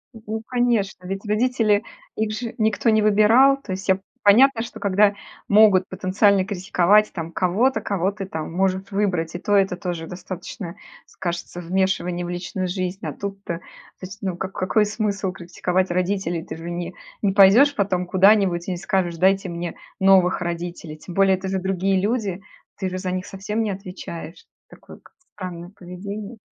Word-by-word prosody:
Н 225 - -11
ну, 220 +1 -3
конечно. 235 -7 0
Ведь 195 +3 -5
родители, 215 -1 +2 0.3
их 220 0 -1
же 230 +1 -5
никто 220 +1 +1
не 220 -1 +4
выбирал. 215 +6 +5
То 195 - -8
есть, 190 +2 -5
я 190 0 +4 0.2
понятно, 235 +4 +6
что 235 - -7
когда 200 +1 +3 0.3
могут 205 -3 +5
потенциально 190 +1 +2
критиковать 200 +1 +2
там 165 -2 -5
кого-то, 195 +10 +1
кого 195 -1 0
ты 200 -1 -6
там 160 -4 -5
может 190 +2 0
выбрать, 180 -5 -1
и - - -3
то 205 +2 +1
это 195 -2 +3
тоже 175 -3 -5
достаточно, 180 0 -7 0.3
скажется, 175 0 -5
вмешивание 180 0 -1
в - - -5
личную 180 +1 -3
жизнь, 185 +2 -4
а - - -2
тут-то. 195 -3 -5
То - - -27 0.4
есть, 195 +3 -8
ну, 185 -3 -3
ка 190 - -4
какой 195 +3 +1
смысл 205 -3 -2
критиковать 180 +1 -2
родителей? 180 -2 -1
Ты - - -7
же 165 +1 -7
не 175 +1 -4 0.3
не 200 -2 +1
пойдешь 210 +9 +6
потом 185 -3 0
куда-нибудь 190 -2 +3
и - - -2
не 180 - -2
скажешь: 175 -1 -1
"Дайте 190 +2 +2
мне 170 0 -5 0.2
новых 190 -2 +4
родителей". 170 -2 -5
Тем 170 +3 -10
более 195 -1 +4
это 190 +1 -6
же 190 0 -1
другие 190 +1 0
люди. 200 -2 -1 0.4
Ты 190 -2 -2
же 185 - -4
за 185 -1 -3
них 185 0 -3
совсем 210 +3 -3
не 215 - -1
отвечаешь. 180 -3 -8 0.2
Такое - - -14
как - - -22 0.2
странное 180 -2 -7
поведение. 200 +5 -7
190 Hz, 175 wpm, -22 LUFS, 180-205 Hz, 0.4 s, понятно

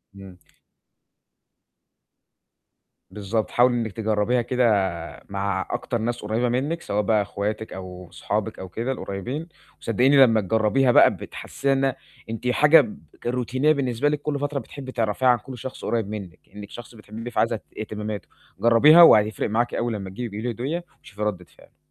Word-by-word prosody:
إمم. 95 -2 -12 2.7
بالضبط، 105 +2 -3
حاولي 120 0 +4
إنِّك 115 -3 -2
تجرَّبيها 110 +3 0
كده 125 +1 0 0.6
مع 100 -1 -2
أكتر 120 - -2
ناس 120 +2 -3
قريّبة 110 +4 -1
منِّك، 145 +7 -1
سواء 105 +1 -1
بقى 105 +1 +2
أخواتِك 105 +2 -4
أو 90 -1 -9
صحابِك 105 +1 -3
أو 95 -1 -7
كده 120 +7 -3
القريّبين 125 - -5 0.3
وصدّقيني 130 +5 +3
لمّا 115 -3 +3
تجرَّبيها 110 +6 +2
بقى - - +6
بتحسّيها 140 0 -3
إنها 135 -1 +1 0.3
أنتِ 115 +2 -4
حاجة 150 +5 +6
ب 110 -5 -7 0.3
روتينية 125 +4 +1
بالنسبة 135 0 0
لِك 150 -1 -2
كل 145 -2 -2
فترة 145 -1 -2
بتحبّي 130 +2 -9
تعرفيها 115 +2 0
عن 125 -1 +5
كل 125 +3 -10
شخص 130 +3 -8
قريّب 115 -3 -1
منِّك، 95 -5 -7 0.2
إنِّك 105 -1 -9
شخص 120 0 -11
بتحبّيه 110 +3 -9
فعايزة 115 - +1
ت - - -9 0.2
اهتمامته. 105 -2 -5 0.3
جرَّبيها 130 +9 +7
وهيفرق 110 -9 +5
معاكِ 120 +3 0
أول 120 -1 -1
لمّا 95 -2 -5
تجيبي 115 +4 -5
تجيبي 110 - -5
له - - 0
هدية 140 +9 -3 0.2
وشوفي 105 -1 -12
رَدِّة 95 -4 -2
فعله. - - -21
115 Hz, 160 wpm, -24 LUFS, 105-130 Hz, 2.7 s, جرَّبيها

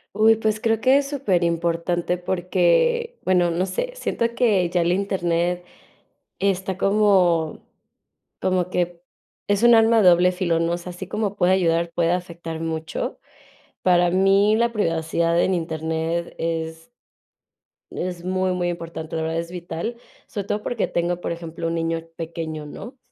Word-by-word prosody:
Uy, 220 +1 +5
pues, 215 -1 -1
creo 225 0 +1
que 260 +3 +5
es 275 - -3
superimportante 175 - 0
porque, 190 - +1
bueno, 180 -2 +3
no 170 +3 0
sé, - - -3
siento 235 - -2
que 205 -8 +2
ya 175 0 +1
el 170 +1 +2
Internet 180 -2 0 0.7
está 190 -1 -1
como 190 -6 +2 0.7
como 185 -1 0
que 175 -1 -2 0.5
es 205 +2 +1
un 240 0 +7
arma 225 -1 +5
doble 180 0 +6
filo, 180 -2 0
¿no?, 165 +1 0
o - - -1
sea, 175 +1 -8
así 180 +1 -8
como 210 0 -2
puede 185 0 +3
ayudar, 170 -2 +2
puede 170 -1 +2
afectar 170 -2 -4
mucho. 160 -1 -4 0.6
Para 175 -1 +4
mí, 195 +3 +4
la 235 0 +1
privacidad 170 -3 +1
en 190 - +2
Internet 160 0 -2
es 165 +3 -4 1.0
es 175 -1 -4
muy, 185 0 0
muy 175 -1 -1
importante, 165 -1 -6
de 160 - -1
verdad, 160 +1 -1
es 170 0 -5
vital. 175 +6 -5 0.3
Sobre 200 -2 -5
todo 210 +1 -2
porque 235 -4 -1
tengo 175 +1 -1
por - - -3
ejemplo 165 0 -5
un 165 - -1
niño 165 0 -2
pequeño, 160 -2 -5
¿no?, 240 - -9
175 Hz, 155 wpm, -23 LUFS, 165-195 Hz, 1.0 s, un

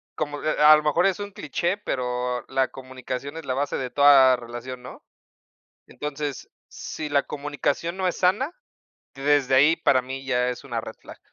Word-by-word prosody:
como, 145 -1 -4
eh, 155 - 0
a 150 +1 +9
a - - +7
lo 150 - -3
mejor 150 +5 +2
es 195 +1 -1
un 205 0 -6
cliché, 180 0 -2
pero 125 - -3
la 130 0 +1
comunicación 130 +3 -7
es 160 - -8
la 130 - -1
base 145 +1 -1
de 130 -1 -4
toda 140 -3 +6
relación, 120 +1 -8
¿no? 125 - -11 0.9
Entonces, 145 -2 -5 0.2
si 155 - -6
la 140 -1 +2
comunicación 145 +4 -3
no 190 -1 -1
es 180 - -3
sana, 210 - +1 0.6
desde 140 -1 +2
ahí 145 +5 +5
para 130 - +3
mí 135 +1 -7
ya 125 -1 +1
es 125 - -7
una 120 -4 -3
red 110 0 -9
flag. - - -13
140 Hz, 185 wpm, -24 LUFS, 130-155 Hz, 0.9 s, a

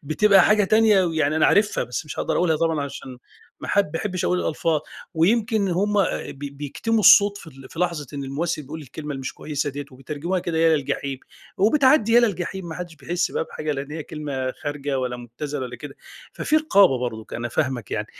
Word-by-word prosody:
بتبقى 195 +6 +4
حاجة 210 -1 +4
تانية، 215 -2 +4
ويعني 155 -3 0
أنا 155 - +4
عارفها 205 -9 +2
بس 125 +5 -4
مش 140 - -8
هاقدَر - - -1
أقولها 165 -3 +2
طبعًا 165 -1 0
عشان 130 -2 -8 0.4
ما - - -7
حب 200 - +3
ما 165 - -1
احبِش 185 -3 -3
أقول 180 0 +1
الألفاظ. 160 0 0 0.3
ويمكن 220 +7 +2
إن 195 - 0
هُم 195 +4 0 0.4
بي 140 +1 -7
بيكتموا 145 +11 -2
الصوت 205 -1 +7
في - - -13
ال 135 -4 -13
في 165 - -12
لحظة 170 -5 -1
إن 140 -1 -4
الممثل 150 +3 -2
بيقول 160 +4 -8
الكلمة 150 +3 -8
اللي 135 -2 -4
مش 130 - -5
كويِسة 145 -1 -3
ديّة، 145 +1 -6
وبيترجموها 150 +7 -4
كده 165 -2 -2
يا 160 -1 +4
للجحيم 140 -1 -3 0.4
وبتعدِّي 230 +2 +4
يا 240 - +7
للجحيم، 190 -4 -2
ما 160 - -6
حدّش 175 -1 -7
بيحس 170 +4 -2
بقى - - -2
بحاجة، 155 -1 -4
لإن 140 +1 -5
هي 160 - -4
كلمة 140 -4 -4
خارجة 145 -2 -4
والّا 125 -1 -2
مُبتذلة 125 +5 -6
والّا 125 -1 -6
كده. 145 -2 -10 0.4
ففي 310 - 0
رقابة 200 - +4
برضُك، 110 -3 -5
أنا 120 0 -3
فاهمَك 130 -3 -2
يعني. - - -2
155 Hz, 205 wpm, -23 LUFS, 140-190 Hz, 0.4 s, الصوت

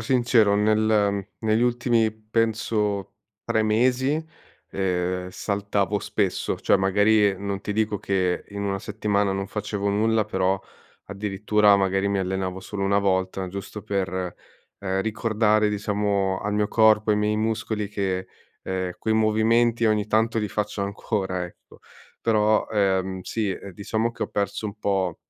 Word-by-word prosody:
sincero, 115 -3 +3
nel 105 -1 +2
negli 110 +1 +1
ultimi 120 -2 +2
penso 110 -2 -1 0.3
3 110 - +1
mesi, 130 +7 +2 0.5
ehm, 90 -1 -1
saltavo 100 0 -1
spesso, 100 -2 -1
cioè - - +4
magari 105 +1 +3
non 100 0 -4
ti 105 - -3
dico 105 -1 0
che 95 -2 -1
in 100 0 -5
1 100 -1 -1
settimana 105 -1 0
non 95 0 -3
facevo 105 0 -3
nulla 110 +2 +2
però 95 +1 0 0.4
addirittura 105 +1 +2
magari 95 0 +1
mi 100 0 0
allenavo 95 0 -2
solo 100 +1 -5
1 100 +1 +3
volta, 95 -1 0
giusto 100 +2 -7
per, 100 -4 -1 0.7
ehm, 95 -1 -1
ricordare 110 0 +1
diciamo 100 -2 0
al 105 - -2
mio 105 0 +1
corpo, 110 -1 +4
ai 105 - +3
miei 105 0 +1
muscoli 110 -1 -2
che, 95 -2 -2 0.4
ehm, 95 -1 -2
quei 110 - 0
movimenti 115 +2 +3
ogni 105 -1 +1
tanto 110 +2 +1
li 105 -1 -1
faccio 105 +1 -2
ancora 100 -2 -2
ecco, 85 - -18 0.4
però, 110 -1 +2
ehm, 95 -2 0
sì 110 +2 -2
e 95 +1 -5
diciamo 110 +5 -1
che - - -5
ho - - -2
perso 100 +1 -2
un 105 0 -8
po' 95 -5 0
105 Hz, 145 wpm, -24 LUFS, 95-110 Hz, 0.7 s, cioè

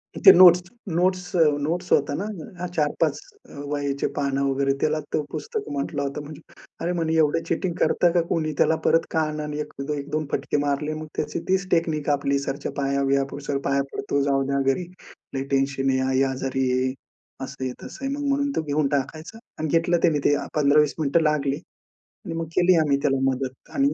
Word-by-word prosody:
ते 390 - +9
notes 180 -1 +8 0.3
notes 180 +1 0
अ 170 - +4 0.2
notes 175 +3 -3
होत्या 145 0 +3
ना, 185 -3 -6
4-5 150 -2 0 0.5
वह्याचे 140 -1 -1
पान 140 -1 0
वगैरे, 135 0 +1
त्याला 155 0 +1
तो - - +2
पुस्तक 445 -1 -4
म्हटलं 140 0 -2
होतं. 145 +2 -5 0.5
अरे, 175 +1 -1
म्हणे, 165 -2 -1
एवढं 160 +1 +2
चीटिंग 170 +1 -1
करता 175 - +3
का 175 - +4
कुणी. 155 -2 0
त्याला 160 - +3
परत 165 - +4
कान 155 -1 -1
आणि 150 0 -4
एक 150 0 -8 0.2
एक 140 +1 -6
दोन 155 0 -1
फटके - - -1
मारले. 150 +2 -1
मग 155 0 -6
त्याची - - -2
तीच 190 0 +1
टेक्निक 160 -3 +1
आपली, 140 -1 +1
सरांच्या 140 +1 -4
पाया 140 0 0
बिया 135 0 +2
पडू. 140 +1 -7
सर 140 - 0
पाया 140 0 +2
पडतो 140 - -1
जाऊ 135 -1 +1
द्या, 140 0 0
घरी 180 - -4 0.5
लई 135 - -1
टेन्शन 135 0 0
आहे, 130 0 +2
आई 130 0 +2
आजारी 130 0 -1
आहे, 130 +1 +1 0.5
असं 135 0 -7
आहे, 130 - -1
तसं 270 - -8
आहे. 275 - -1
मग 290 -1 -3
म्हणून 280 0 +1
तो - - +1
घेऊन 150 -1 0
टाकायचा 155 +10 -6 0.2
आणि 155 - -1
घेतलं 165 +2 +2
त्याने 155 -4 +3
ते 145 - +4 0.2
15-20 150 0 +3
मिनिटं 155 +2 +2
लागली 145 -2 +1 0.7
आणि 165 - -4
मग 165 0 -2
केली 180 0 +5
आम्ही 140 -1 +2
त्याला 135 -1 +2
मदत 130 0 -6
आणि 280 +1 +2
150 Hz, 190 wpm, -24 LUFS, 140-170 Hz, 0.7 s, ते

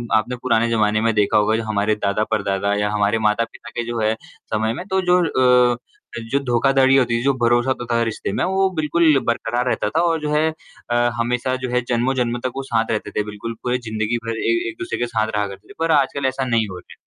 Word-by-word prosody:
आपने 110 +3 +1
पुराने 115 -2 +2
ज़माने 110 -2 +2
में 115 0 +2
देखा 105 -1 +2
होगा 105 +1 +3
जो 115 - -1
हमारे 105 0 0
दादा, 105 0 0
परदादा 100 -1 0
या 105 0 0
हमारे 105 +1 +1
माता-पिता 110 +2 -1
के 120 - -1
जो 120 -1 -3
है 110 0 +2 0.4
समय 110 +1 +1
में 175 +9 -6
तो 190 0 +1
जो 180 - +6 0.6
अ, - - -6 0.5
जो 140 - +2
धोखाधड़ी 135 +2 +3
होती 120 -3 +2
थी, 120 - -3
जो 140 +1 +3
भरोसा 120 +2 +3
होता 125 -2 -2
था 115 - +2
रिश्ते 115 -3 -3
में - - 0
वो 190 +1 +2
बिल्कुल 155 -1 +3
बरकरार 120 +1 0
रहता - - 0
था - - +4
और 165 -2 +1
जो 150 0 -2
है 155 +1 +3 0.4
अ, - - +2 0.2
हमेशा 125 +2 0
जो - - -3
है 125 0 +1
जन्मों-जन्म 120 0 0
तक 130 - -1
वो 135 - -3
साथ 115 -3 0
रहते 110 - -2
थे, 105 - -1
बिल्कुल 105 +2 -6
पूरे 125 0 0
ज़िंदगी 110 +1 -1
भर 115 0 -3
ए 345 - +1
एक-दूसरे 355 +1 -5
के 120 - +1
साथ 110 -2 0
रहा 105 0 +1
करते 100 0 -11
थे, - - -11
पर 165 0 +1
आजकल 140 +1 -3
ऐसा 130 0 -2
नहीं 115 -3 +1
हो 90 - -7
रहा - - -15
120 Hz, 230 wpm, -21 LUFS, 110-135 Hz, 0.6 s, जो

